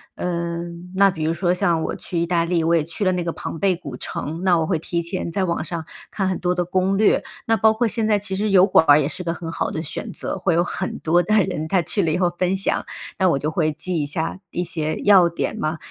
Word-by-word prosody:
嗯， 170 0 -4
那 200 +1 +5
比 165 -4 -4
如 160 +1 +1
说 175 +1 +1
像 170 -2 +1
我 - - -3
去 175 - -4
意 170 - +1
大 170 -1 +2
利， 170 0 0
我 170 +1 +3
也 165 - +2
去 170 +6 -4
了 185 - +3
那 180 -1 -1
个 170 - -2
庞 165 - -6
贝 190 -1 +2
古 140 -7 -8
城， 155 +6 -5
那 180 -2 +4
我 160 - 0
会 185 - +1
提 170 +2 -2
前 170 0 -3
在 190 +3 0
网 170 -2 -1
上 165 -1 -5 0.2
看 195 -2 -2
很 185 - -1
多 180 -1 0
的 180 -1 -1
攻 185 +2 +1
略。 215 0 +3 0.2
那 225 - +3
包 220 0 +4
括 225 +1 +1
现 225 0 0
在 210 -1 +3
其 195 -1 -3
实 210 +2 -1
油 190 -1 +6
管 160 - +4
儿 145 +1 +7
也 140 - +1
是 180 - -3
个 165 -1 -1
很 165 -1 -7
好 - - -2
的 160 - -3
选 150 - -6
择， - - -3
会 180 -1 +1
有 170 +1 +3
很 185 +1 -3
多 175 +2 +2
的 215 +5 +1
人 155 +2 -4
他 185 0 +3
去 200 +5 +1
了 165 -4 +1
以 160 - +1
后 180 -1 +2
分 185 +1 +1
享， 195 - 0 0.3
那 190 -1 +3
我 140 - +1
就 150 - -1
会 155 -1 +1
记 170 +2 -2
一 - - -1
下 160 +5 -3
一 175 - -2
些 155 -3 -2
要 190 -4 +6
点 170 +5 -3
嘛。 155 -4 -2
175 Hz, 295 characters per minute, -22 LUFS, 165-190 Hz, 0.3 s, 儿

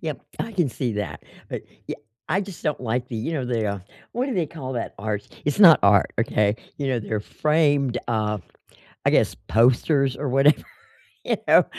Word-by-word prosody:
Yep, - - -4 0.2
I 230 - -4
can 175 -8 +1
see 120 -1 -2
that, 90 -8 -4 0.3
but, - - -5 0.2
ye - - -3 0.3
I 195 - +2
just 195 -3 -8
don't 150 -4 -1
like 125 +1 -2
the, 115 - -5
you 115 +9 -3
know, 140 -4 -1
the, 115 -3 -1
uh 100 -1 -2 0.3
what 245 +3 -1
do 275 - -2
they 175 -5 +1
call 135 -5 -7
that 120 - -4
art? 105 0 -3 0.2
It's 145 +4 -1
not 165 -7 +10
art, 100 -1 +4
okay? 105 -2 +2 0.2
You 140 - -2
know, 125 -2 +1
they're 110 -1 -3
framed, 145 -1 +1
uh, 105 -2 0 0.7
I - - +4
guess, - - +3
posters 130 +4 +3
or 145 - -3
whatever, 135 +3 +4 0.6
you - - 0
know, - - +6
130 Hz, 195 wpm, -24 LUFS, 110-150 Hz, 0.7 s, not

